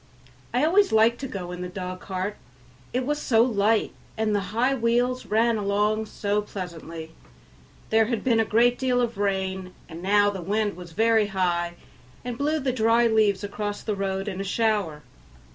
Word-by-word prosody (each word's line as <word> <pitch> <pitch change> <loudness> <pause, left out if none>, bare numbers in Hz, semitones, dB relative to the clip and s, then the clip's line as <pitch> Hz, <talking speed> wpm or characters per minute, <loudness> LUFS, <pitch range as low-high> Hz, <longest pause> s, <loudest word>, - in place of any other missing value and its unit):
I 250 +5 +2
always 395 +5 +4
liked 225 +2 +4
to 270 - -4
go 180 -6 -6
in 180 0 -6
the 180 - -4
dog 185 0 -6
cart, 190 +2 -4 0.6
it 250 +1 -1
was 295 +2 -1
so 225 -2 +4
light 220 -2 +1 0.2
and 220 -1 0
the 205 - +2
high 240 +6 +1
wheels 245 +1 0
ran 225 +1 +2
along 210 +2 0
so 205 0 -1
pleasantly. 170 -5 -7 0.8
There 220 0 +5
had 230 -1 -2
been 235 -3 +3
a - - +4
great 235 +3 +3
deal 255 -1 +1
of 235 -3 -1
rain, 190 -2 -2
and 165 0 -9
now 205 +2 +3
the 195 -2 -6
wind 205 +3 -1
was 175 -2 -11
very 225 +1 +3
high 175 -3 -1 0.5
and 245 -1 -3
blew 295 +5 0
the 265 -3 -1
dry 230 0 +3
leaves 215 -3 +2
across 205 0 -4
the 215 - -2
road 195 0 -2
in 195 -1 -3
a - - -2
shower. 200 -7 0
210 Hz, 180 wpm, -25 LUFS, 190-235 Hz, 0.8 s, There